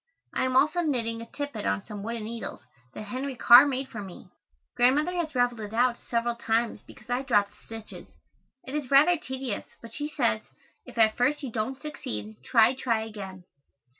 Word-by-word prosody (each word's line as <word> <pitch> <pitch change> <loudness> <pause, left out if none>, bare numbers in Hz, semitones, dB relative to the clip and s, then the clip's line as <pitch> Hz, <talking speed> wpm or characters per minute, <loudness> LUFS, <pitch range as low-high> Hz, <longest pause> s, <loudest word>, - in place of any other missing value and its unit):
I - - +1
am 255 0 -1
also 305 +6 +4
knitting 230 -7 -1
a 230 - -8
tippet 285 -8 -5
on 195 - 0
some 210 -2 -7
wooden 230 +1 -4
needles 230 +1 -6 0.3
that - - -6
Henry 260 +5 -4
Carr 245 +3 +8
made 265 -1 -2
for 215 - -7
me. 190 -3 -11 0.4
Grandmother 280 +8 +3
has 330 -5 -3
raveled 245 -2 +2
it 210 0 -6
out 245 0 +3
several 235 0 -1
times 230 0 0
because 215 - -15
I 245 +1 +1
dropped 205 -6 +2
stitches. 225 -1 -10 0.5
It 265 - -8
is 295 -4 -3
rather 295 +6 +6
tedious, 260 -7 -5
but 230 -1 -12
she 295 +3 -3
says, 235 -7 +1 0.5
"If - - -12
at 220 -1 +5
first 285 +5 +1
you 260 - -4
don't 240 +4 -3
succeed, 110 - -6
try, 225 - +5
try 235 -4 0
again." 195 -4 -8
240 Hz, 185 wpm, -27 LUFS, 220-270 Hz, 0.5 s, Carr